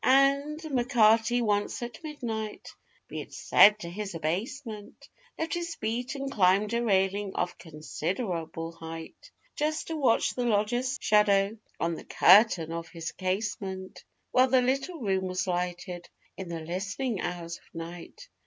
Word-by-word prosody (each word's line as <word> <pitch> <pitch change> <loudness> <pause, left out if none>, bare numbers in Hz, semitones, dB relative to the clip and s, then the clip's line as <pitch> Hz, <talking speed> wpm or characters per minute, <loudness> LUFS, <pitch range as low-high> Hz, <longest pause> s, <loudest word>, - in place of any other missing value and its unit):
And 275 +3 +4
M'Carty, 240 -4 +3
once 205 +2 0
at 240 +5 -8
midnight 230 -8 -5 0.3
be - - -5
it - - -11
said 210 +1 +6
to 170 - -5
his 195 -1 -5
abasement 210 - -4 0.3
Left 320 -2 -2
his 345 -1 -3
beat 240 +5 -3
and 275 0 -4
climbed 200 0 +3
a 235 0 +1
railing 195 -1 +1
of 175 - -2
considerable 165 +1 -4
height, 165 -1 -9 0.3
Just 310 +1 -1
to 325 - -2
watch 265 -7 +2
the 245 - -2
lodger's 240 +5 +1
shadow 205 -1 +3 0.2
on 170 0 0
the - - -7
curtain 185 -4 +5
of 165 0 -5
his 165 -1 -6
casement 190 0 -3 0.3
While 255 +1 +5
the 260 -1 +4
little 275 +7 -1
room 190 -5 0
was 185 0 -1
lighted 180 -1 -3 0.3
in 190 -2 -7
the 165 -1 -4
listening 195 +7 -3
hours 170 -1 -4
of - - -27
night. 170 - -9
210 Hz, 145 wpm, -28 LUFS, 180-250 Hz, 0.3 s, said